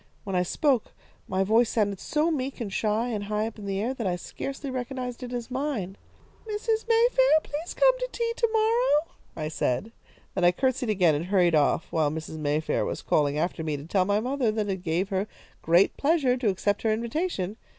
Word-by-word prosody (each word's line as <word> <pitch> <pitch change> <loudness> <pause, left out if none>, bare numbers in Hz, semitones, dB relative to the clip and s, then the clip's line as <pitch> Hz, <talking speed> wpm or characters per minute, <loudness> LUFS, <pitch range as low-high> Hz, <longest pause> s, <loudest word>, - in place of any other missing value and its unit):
When 195 -2 -4
I 180 - +3
spoke, 255 - +1 0.3
my 190 +1 +1
voice 225 +4 +3
sounded 205 -4 0
so 310 +2 0
meek 275 -3 -3
and 210 -5 -4
shy 220 +4 0
and 210 -3 -3
high 210 +1 -1
up 225 -1 -7
in 200 - -7
the 195 0 -1
air 235 +5 -1
that 230 -6 -3
I 180 - 0
scarcely 275 - -6
recognised 250 -1 -4
it 250 -1 -6
as 245 0 -5
mine. 255 -9 -2 0.5
"'Mrs. 440 +1 -1
Mayfair, 475 -4 +5
please 310 +4 -5
come - - +4
to - - -3
tea 465 -1 -1
to 465 - +2
morrow,' 440 -7 +2 0.2
I 155 -1 -3
said. 155 - -1 0.4
Then 185 - -1
I 175 - +7
courtesied 260 +2 0
again, 180 -6 +4
and 150 +3 -2
hurried 180 -3 +3
off, 155 +1 +3
while 155 -3 +2
Mrs. 160 +1 -6
Mayfair 150 +1 0
was - - -4
calling 145 -1 +1
after 165 +1 -1
me 155 -2 -2
to 140 - -9
tell 185 +2 +1
my 205 +2 +2
mother 250 0 0
that 215 -1 -2
it 190 - -1
gave 175 +3 -1
her 195 +1 -1 0.3
great 170 +4 +4
pleasure 285 -4 +2
to 245 -4 0
accept 200 +1 0
her 220 - +1
invitation. 225 - -2
220 Hz, 205 wpm, -27 LUFS, 185-275 Hz, 0.5 s, I